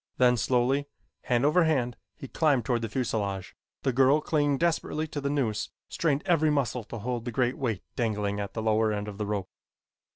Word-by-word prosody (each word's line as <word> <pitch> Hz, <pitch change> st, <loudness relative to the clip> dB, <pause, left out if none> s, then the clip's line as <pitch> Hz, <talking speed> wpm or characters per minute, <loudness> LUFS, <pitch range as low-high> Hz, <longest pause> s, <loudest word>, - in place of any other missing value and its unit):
Then 125 Hz, -1 st, +5 dB
slowly, 125 Hz, +4 st, +1 dB, 0.4 s
hand 120 Hz, +1 st, +2 dB
over 165 Hz, +4 st, +4 dB
hand, 125 Hz, -7 st, +1 dB, 0.2 s
he 135 Hz, -, -8 dB
climbed 145 Hz, -4 st, +2 dB
toward 120 Hz, -3 st, +1 dB
the 115 Hz, -, -3 dB
fuselage. 105 Hz, -5 st, -2 dB, 0.3 s
The 130 Hz, -, +1 dB
girl, 135 Hz, +4 st, +5 dB
clinging 145 Hz, -2 st, +1 dB
desperately 160 Hz, -1 st, 0 dB
to 145 Hz, -, -4 dB
the 140 Hz, -, -1 dB
noose, 125 Hz, -7 st, -1 dB, 0.2 s
strained 150 Hz, -3 st, 0 dB
every 160 Hz, -3 st, +3 dB
muscle 125 Hz, -5 st, 0 dB
to 115 Hz, -, -7 dB
hold 120 Hz, +2 st, -3 dB
the 120 Hz, -, -3 dB
great 125 Hz, +1 st, +1 dB
weight 115 Hz, -8 st, -2 dB
dangling 105 Hz, -4 st, -1 dB
at 100 Hz, -1 st, -5 dB
the 110 Hz, -, -2 dB
lower 110 Hz, 0 st, +2 dB
end 105 Hz, 0 st, -3 dB
of 105 Hz, -1 st, -8 dB
the 105 Hz, -, -2 dB
rope. 100 Hz, -3 st, -3 dB
125 Hz, 195 wpm, -28 LUFS, 110-140 Hz, 0.4 s, Then